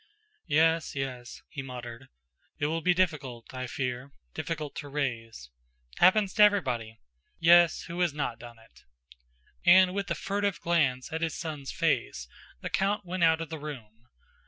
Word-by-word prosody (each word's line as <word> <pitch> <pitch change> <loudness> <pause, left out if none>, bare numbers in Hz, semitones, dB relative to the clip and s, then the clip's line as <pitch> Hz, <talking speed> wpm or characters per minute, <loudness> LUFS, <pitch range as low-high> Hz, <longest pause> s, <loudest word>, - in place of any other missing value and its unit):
"Yes, 160 +1 +2
yes," 130 -3 -5
he 145 - -6
muttered, 125 -1 -8 0.5
"it 145 - -1
will 165 +2 -1
be 180 +1 +3
difficult, 140 -11 -2
I 130 0 -4
fear, 125 +1 -4 0.2
difficult 155 -3 -4
to 145 - -6
raise... 115 - -4 0.5
happens 190 +2 +4
to 215 - +1
everybody! 125 - +3 0.4
Yes, 170 0 +5
who 175 0 -7
has 175 -3 +2
not 140 -6 -3
done 120 -1 -11
it?" 115 - -21 0.8
And 185 +1 +6
with 200 0 -3
a 170 - 0
furtive 200 -1 -2
glance 150 -6 0
at 160 - -2
his 165 -1 -2
son's 150 -5 -5
face, - - -1 0.3
the - - -4
count 200 +1 0
went 180 0 -2
out 160 0 +4
of 165 - -5
the 160 - -6
room.... 120 -6 -9
150 Hz, 160 wpm, -28 LUFS, 125-175 Hz, 0.8 s, And